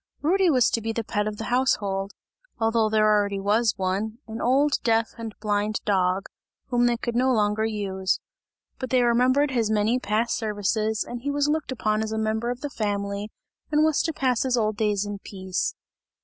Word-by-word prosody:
Rudy 370 +4 +3
was 255 -6 +4
to 230 - 0
be 225 +1 -2
the 230 - -2
pet 210 -1 -1
of 210 0 -4
the 225 - -5
household, 200 -6 0 0.5
although 225 -1 +2
there 215 0 +3
already 205 -2 +2
was 210 +3 +2
one, 195 +4 -2
an 225 0 -6
old 275 +4 +3
deaf 225 -1 +1
and 225 -2 -6
blind 210 0 0
dog, 190 -1 +1 0.4
whom 245 -1 +3
they 240 -1 +1
could 235 0 -4
no 260 +2 +3
longer 215 -1 +1
use; 195 -3 -1 0.6
but 260 - -4
they 255 -1 +3
remembered 255 +4 +3
his 230 -4 +1
many 220 +3 +2
past 225 +1 0
services 215 0 -1
and 240 0 -7
he 285 - -3
was 290 0 +1
looked 310 -2 -1
upon 215 -4 0
as 220 0 -3
a 220 - -2
member 220 +2 -1
of 245 +1 -4
the 290 - -3
family 200 -1 -2 0.4
and 300 0 +4
was 315 -1 +3
to 325 - -1
pass 255 -5 0
his 255 -2 +1
old 215 -2 +1
days 210 -2 0
in 205 -1 -5
peace. 190 -2 -3
220 Hz, 195 wpm, -25 LUFS, 205-245 Hz, 0.6 s, was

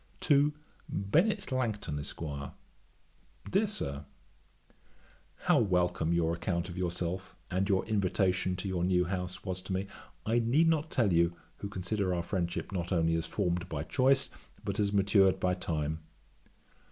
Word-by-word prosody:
'To 145 0 +4 0.4
BENNET 155 - +1
LANGTON, 110 - -1
ESQ. 70 - -5 1.3
'DEAR 205 +3 +3
SIR, 70 - -3 1.3
'How - - +3
welcome 90 -5 +1
your 85 -1 +2
account 85 +1 -2
of 85 - -7
yourself 90 +1 -2 0.2
and 95 +2 0
your 95 -1 +2
invitation 95 -3 +1
to 90 +2 -4
your 90 -2 -1
new 90 -1 +3
house 90 0 -4
was 95 0 -2
to 95 0 -4
me, 95 +1 -1 0.4
I 115 +2 +3
need 130 +8 +3
not 160 -1 +2
tell 110 - +2
you, 85 +1 +3 0.2
who 100 - -5
consider 95 -1 -1
our 85 - -1
friendship 85 0 -2
not 90 -2 -3
only 80 -2 +2
as 80 0 0
formed 90 -2 -1
by 75 -2 -3
choice, 130 - +3 0.3
but 100 0 -2
as 100 -1 +2
matured 100 -1 +4
by 90 0 +2
time. 80 -3 -2
95 Hz, 150 wpm, -31 LUFS, 85-105 Hz, 1.3 s, To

